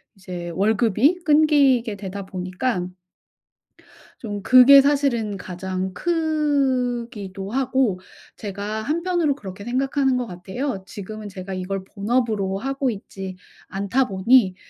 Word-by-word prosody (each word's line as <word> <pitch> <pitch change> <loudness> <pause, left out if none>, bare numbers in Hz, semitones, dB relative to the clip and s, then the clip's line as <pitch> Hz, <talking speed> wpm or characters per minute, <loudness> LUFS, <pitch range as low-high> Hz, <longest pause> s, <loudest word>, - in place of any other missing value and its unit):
이제 180 -3 -7
월급이 220 - +2
끊기게 285 -7 +4
되다 195 0 -6
보니까 185 +2 -2 1.3
좀 205 -3 -5
그게 255 +4 +8
사실은 270 -7 +1
가장 185 0 -4
크기도 255 - -1
하고 260 -6 +1 0.4
제가 205 +1 -4
한편으로 330 +2 0
그렇게 195 -6 -9
생각하는 265 +2 +1
것 250 - -2
같아요. 190 +5 -5
지금은 210 +2 -8
제가 190 -1 -7
이걸 185 +1 -4
본업으로 205 -2 -1
하고 270 +4 -1
있지 195 -3 -7 0.3
않다 200 +7 0
보니 195 +1 +3
220 Hz, 255 characters per minute, -22 LUFS, 190-270 Hz, 1.3 s, 그게